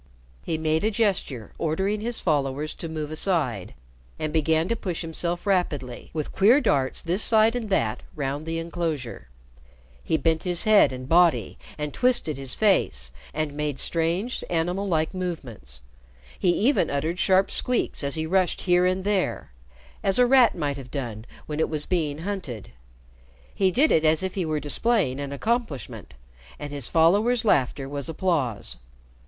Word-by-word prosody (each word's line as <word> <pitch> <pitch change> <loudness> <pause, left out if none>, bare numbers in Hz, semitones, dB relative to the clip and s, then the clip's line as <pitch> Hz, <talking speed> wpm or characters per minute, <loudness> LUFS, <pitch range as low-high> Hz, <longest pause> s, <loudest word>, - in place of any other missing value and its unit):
He 160 - -2
made 160 +1 0
a 215 - +3
gesture 195 - -1
ordering 190 +6 -1
his 235 +1 -2
followers 145 -2 -1
to 165 - -7
move 155 -1 -4
aside, 155 - -1 0.4
and 155 -1 -3
began 160 +1 +2
to 230 - +1
push 185 -6 -4
himself 170 +2 -1
rapidly, 150 -11 -1
with 155 -2 -4
queer 220 +8 +5
darts 135 - 0
this 175 +5 0
side 220 +1 +4
and 230 -4 -3
that 115 - 0
round 145 +1 -3
the 165 0 -2
inclosure. 165 - -4 0.7
He 160 - +1
bent 160 -1 +1
his 175 -2 0
head 215 -7 +5
and 130 0 -7
body, 170 +2 +3 0.2
and 150 -1 -4
twisted 245 - +1
his 135 -2 0
face, 65 - +1 0.2
and 155 -1 -3
made 150 -2 -3
strange 170 - -1
animal 175 +4 -1
like 160 -2 0
movements. 125 - -6 0.6
He 180 - +2
even 235 +10 +2
uttered 160 +5 -2
sharp 190 0 +3
squeaks 250 -10 0
as 140 0 0
he 160 0 -2
rushed 185 +1 +1
here 180 0 +3
and 185 +1 -1
there 200 - -1 0.5
as 195 0 +2
a 250 - +6
rat 250 -1 +5
might 145 -4 -2
have 130 -2 -9
done 120 -6 -5 0.2
when 150 0 -5
it 160 - +1
was 150 -2 -3
being 155 -5 -1
hunted. 175 - -5 0.8
He 190 -1 +2
did 275 - +3
it 160 - +3
as 155 +2 +3
if 190 - -2
he 185 -3 -2
were 155 -1 -1
displaying 150 - +2
an 140 -1 -5
accomplishment, 215 - -3 0.4
and 145 -1 -7
his 140 -4 -4
followers' 205 +9 +3
laughter 135 - +1
was 140 +2 -4
applause. 140 - -1
160 Hz, 165 wpm, -25 LUFS, 145-190 Hz, 0.8 s, a